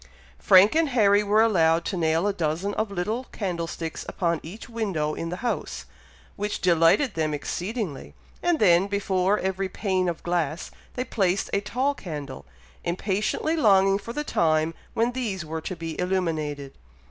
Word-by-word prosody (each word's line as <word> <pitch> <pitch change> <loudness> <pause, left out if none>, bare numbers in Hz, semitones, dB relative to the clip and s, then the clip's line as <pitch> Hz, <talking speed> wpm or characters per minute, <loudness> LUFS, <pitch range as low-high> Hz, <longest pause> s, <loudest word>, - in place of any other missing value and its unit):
Frank 190 +3 +6
and 320 -1 +2
Harry 205 -5 +4
were 210 +2 +3
allowed 165 -6 +3
to - - -2
nail 165 +1 +1
a 205 - +1
dozen 175 +3 -1
of 220 0 -1
little 210 +7 -2
candlesticks 170 -6 -4
upon 170 -3 0
each 190 +9 -9
window 195 -10 -2
in 165 - -4
the 175 - -3
house, 240 - -3 0.5
which 205 +1 -3
delighted 175 - +3
them 155 -2 -1
exceedingly, 185 - -4 0.3
and 350 -1 +2
then, 185 - +4
before 195 -1 +1
every 190 0 -2
pane 185 -2 0
of 170 - -5
glass, 170 -3 -2 0.2
they 250 - -1
placed 195 -4 0
a 200 - +2
tall 255 +7 0
candle, 150 - -7 0.4
impatiently 200 - -1
longing 195 -7 +4
for 220 +3 -7
the 295 +5 -3
time 160 - +1 0.2
when 230 +2 +2
these 215 -9 -3
were 160 +1 -4
to 185 - -5
be 165 0 -5
illuminated. 155 -7 -2
190 Hz, 160 wpm, -25 LUFS, 165-210 Hz, 0.5 s, Frank